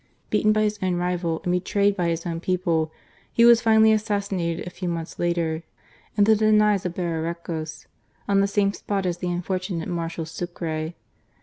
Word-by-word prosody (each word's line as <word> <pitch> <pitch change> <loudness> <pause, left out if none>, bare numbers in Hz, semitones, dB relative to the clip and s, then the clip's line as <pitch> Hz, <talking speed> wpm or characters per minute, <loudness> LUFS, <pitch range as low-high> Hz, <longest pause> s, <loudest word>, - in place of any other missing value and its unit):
Beaten 215 - +3
by 215 0 +2
his 210 0 -1
rival 175 -2 -1
and 180 - 0
betrayed 200 +3 +1
by 175 -3 0
his 165 0 -2
130 175 +2 -1
GARCIA 185 - -23
MORENO. 165 -2 +3
own - - 0
people, 155 - -30 0.4
he 235 - +4
was 235 -1 +7
finally 220 -1 +5
assassinated, 200 -6 -1
a 180 - -6
few 180 0 -4
months 165 -1 -5
later, 170 -2 0 0.6
in 205 - +5
the 220 +1 +5
defiles 210 -2 +3
of 175 - -7
Bemiecos, 165 -2 -4 0.4
on 200 -1 +3
the 200 - +3
same 200 0 +1
spot 200 -2 -2
as 175 -1 -1
the 180 - -2
unfortunate 180 -1 -2
Marshal 165 -1 -3
Sucre. 165 -1 -4
180 Hz, 185 wpm, -24 LUFS, 170-205 Hz, 0.6 s, was